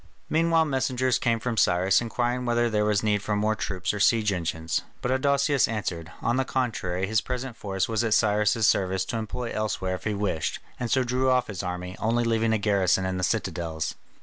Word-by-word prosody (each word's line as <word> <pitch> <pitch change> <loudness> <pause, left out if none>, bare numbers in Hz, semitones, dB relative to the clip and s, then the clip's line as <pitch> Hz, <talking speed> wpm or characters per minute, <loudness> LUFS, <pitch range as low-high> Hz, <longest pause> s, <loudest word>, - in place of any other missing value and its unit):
Meanwhile 165 0 +3
messengers 130 -3 0
came 115 -2 +1
from 115 0 -3
Cyrus 95 +1 +3
inquiring 120 +1 -1
whether 120 -1 +1
there 105 -1 +1
was 105 -1 +1
need 105 -1 +1
for 105 +1 -1
more 105 +1 +1
troops 95 -2 -2
or 105 - -4
siege 110 0 +3
engines, 80 -3 -2 0.2
but 125 - -2
Adousius 140 0 +2
answered, 85 -7 -4
on 120 +2 +1
the 130 - +2
contrary 115 -8 -1
his 110 +2 +1
present 125 -1 -4
force 95 -3 -2
was 115 0 0
at 110 -2 +2
Cyrus' 105 0 +2
service 95 -1 +2
to 115 - -3
employ 115 +2 -4
elsewhere 105 -3 -2
if 90 - -6
he 105 -1 0
wished, 100 -6 -1 0.2
and 120 - -2
so 130 +1 +3
drew 125 +1 +1
off 125 -1 +3
his 100 -4 -5
army, 90 0 -5
only 115 +2 +1
leaving 115 -1 +1
a 110 - +3
garrison 95 -3 +2
in 95 0 -2
the - - -3
citadels. 80 -3 -2
110 Hz, 205 wpm, -26 LUFS, 95-120 Hz, 0.2 s, Meanwhile